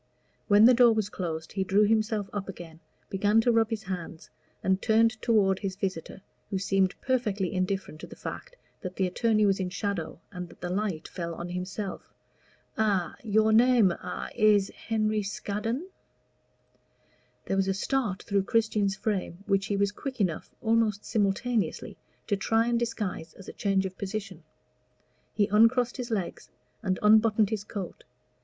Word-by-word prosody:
When 205 +1 +7
the 250 - +8
door 240 -1 +6
was 215 -2 0
closed 160 -5 -4
he 195 - 0
drew 200 +2 +3
himself 215 -1 +1
up 200 -1 -4
again, 170 -3 -9 0.3
began 205 +3 +3
to 240 - +3
rub 225 -1 +3
his 220 -2 -3
hands, 175 -4 -6 0.3
and 190 +1 +1
turned 225 0 +4
toward 195 -5 +3
his 195 -2 -3
visitor, 190 -1 -4 0.3
who 195 - -1
seemed 195 -1 +1
perfectly 210 -8 0
indifferent 185 -4 -2
to - - -8
the - - -11
fact - - -7 0.3
that 185 -1 -6
the 190 - +1
attorney 215 +3 +2
was 195 -1 +2
in 185 -1 -1
shadow, 185 -4 -3
and 180 -2 -6
that - - -16
the 175 - -3
light 190 -4 -2
fell 170 -2 -5
on 175 +1 -6
himself. 185 +3 -4 0.8
"A 200 -5 +1
your 220 0 +3
name 235 -4 +5
a - - -6
is 210 -3 +4
Henry 215 -1 -1
Scaddon." 210 - -3 1.6
There - - -1
was 195 0 +2
a 195 - +2
start 210 -3 -1
through 200 -1 0
Christian's 215 -3 +1
frame 200 -3 -3
which 195 +1 +1
he 205 - -1
was 200 0 +2
quick 260 +4 -6
enough, 180 -6 -1
almost 220 -2 +1
simultaneously, 215 +2 -1 0.3
to 205 - +1
try 225 +3 +1
and 235 0 +1
disguise 205 -8 -3
as 195 - -13
a - - -7
change 195 -1 +1
of 190 0 -6
position. 200 -4 -5 0.9
He 205 - +3
uncrossed 230 +5 +3
his 250 -1 -4
legs 200 -6 -3 0.3
and 190 -4 0
unbuttoned 215 0 +5
his 215 -2 -2
coat. 200 -4 -7
205 Hz, 165 wpm, -28 LUFS, 190-220 Hz, 1.6 s, the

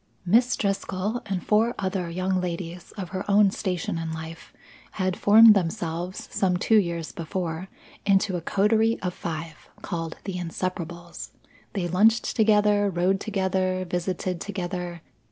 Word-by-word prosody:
Miss 235 +7 +4
Driscoll 200 +2 -2
and 190 -3 -3
four 225 +3 +2
other 185 -2 -2
young 185 +2 -1
ladies 175 0 -5
of 190 -4 -6
her 190 0 -4
own 200 -1 +5
station 180 -4 -2
in 165 -1 -4
life 160 0 -8 0.4
had 185 -2 -1
formed 220 +2 +8
themselves, 175 -1 -2
some 180 -2 +1
two 220 +4 +4
years 170 -4 -2
before, 170 +1 -4 0.4
into 195 -1 +2
a 175 - -2
coterie 220 +5 +2
of 180 -1 -1
five, 160 -2 -6
called 165 -1 -4
The 190 -2 -4
Inseparables. 175 0 -5 0.4
They 185 -4 -1
lunched 215 +6 +3
together, 210 -2 +4
rode 185 +2 +1
together, 190 -3 -1
visited 180 0 -2
together. 180 -3 -4
185 Hz, 135 wpm, -25 LUFS, 175-200 Hz, 0.4 s, formed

